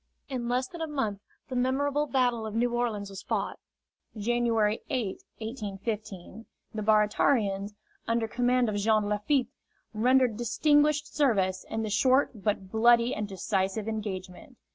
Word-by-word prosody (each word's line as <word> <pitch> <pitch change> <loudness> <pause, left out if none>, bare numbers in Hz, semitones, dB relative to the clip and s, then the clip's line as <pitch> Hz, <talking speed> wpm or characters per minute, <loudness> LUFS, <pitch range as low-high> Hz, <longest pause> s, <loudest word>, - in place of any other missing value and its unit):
In 245 -3 -3
less 250 +1 0
than 340 +3 -9
a 320 - -1
month 225 -10 -2 0.3
the 260 - -5
memorable 280 +4 +1
Battle 245 -4 +1
of 215 - -6
New 240 +1 +1
Orleans 220 -5 -2
was 195 0 -7
fought - - -2 0.6
January 225 -1 +1
8, 235 -9 -2 0.2
1815. 215 -2 -6 0.3
The 215 - -3
Baratarians, 210 -1 +2 0.3
under 230 0 +1
command 245 +2 +2
of 210 -1 -1
Jean 215 0 +2
Lafitte, 240 +5 +1 0.4
rendered 245 +1 +3
distinguished 295 +5 +2
service 195 -10 +2
in 220 0 -2
the 215 - -3
short 260 +6 +3
but 200 -3 -1
bloody 235 +2 +4
and 210 -1 -3
decisive 195 +2 -2
engagement. 205 +1 -6
225 Hz, 140 wpm, -28 LUFS, 210-255 Hz, 0.6 s, bloody